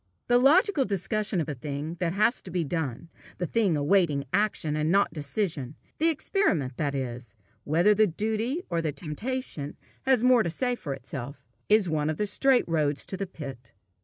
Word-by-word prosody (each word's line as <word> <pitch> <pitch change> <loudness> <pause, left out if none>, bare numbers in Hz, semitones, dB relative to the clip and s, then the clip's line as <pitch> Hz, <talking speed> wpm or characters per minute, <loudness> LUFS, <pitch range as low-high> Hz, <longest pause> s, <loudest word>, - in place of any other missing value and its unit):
The 245 0 +5
logical 300 +4 +4
discussion 205 -1 -1
of 160 - -1
a 150 - -2
thing 145 +5 -5
that 175 -2 0
has 215 +5 +2
to - - -10
be 180 -1 -1
done, 160 -2 -3 0.3
a 180 - 0
thing 195 -4 +1
awaiting 145 -2 +2
action 200 -7 +1
and 155 +1 0
not 200 +3 +3
decision 150 - -3 0.2
the 325 +2 +4
experiment, 190 - 0
that 145 -2 -1
is, 125 -2 -5 0.3
whether 170 +8 +4
the 215 +1 +4
duty 220 - -2
or 170 -2 -1
the 155 -3 -2
temptation 165 - -5 0.3
has 260 -4 +4
the - - +1
more 250 -2 +6
to 175 - -1
say 245 +9 -1
for 145 - -4
itself, 140 0 -8 0.2
is 210 -2 +5
one 155 -2 0
of 155 - -2
the 210 - 0
straight 255 +5 +3
roads 150 -3 0
to - - -5
the 195 0 -4
pit. 135 -8 -9
175 Hz, 190 wpm, -27 LUFS, 150-215 Hz, 0.3 s, more